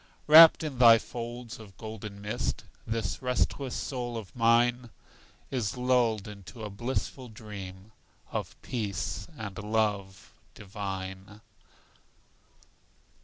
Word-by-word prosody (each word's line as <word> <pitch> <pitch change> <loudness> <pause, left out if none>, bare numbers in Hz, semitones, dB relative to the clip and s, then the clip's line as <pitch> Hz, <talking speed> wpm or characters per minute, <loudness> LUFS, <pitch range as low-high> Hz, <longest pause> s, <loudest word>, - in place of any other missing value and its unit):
Wrapped 160 +2 +9
in 140 -5 -4
thy 115 -2 +9
folds 120 0 -7
of 100 -4 -13
golden 105 -2 -8
mist, 105 - -2 0.2
This 110 -3 -2
restless 125 +1 -1
soul 120 -3 -3
of 110 +3 -9
mine 120 +1 +3 0.6
Is 125 -1 -2
lulled 125 -5 +2
into 100 +1 -10
a 105 - -5
blissful 125 +3 -4
dream 100 -2 -9 0.4
Of - - -4
peace 100 - -3
and 100 -5 -6
love 105 -3 -1 0.2
divine. 95 0 -6
110 Hz, 105 wpm, -29 LUFS, 100-120 Hz, 0.6 s, Wrapped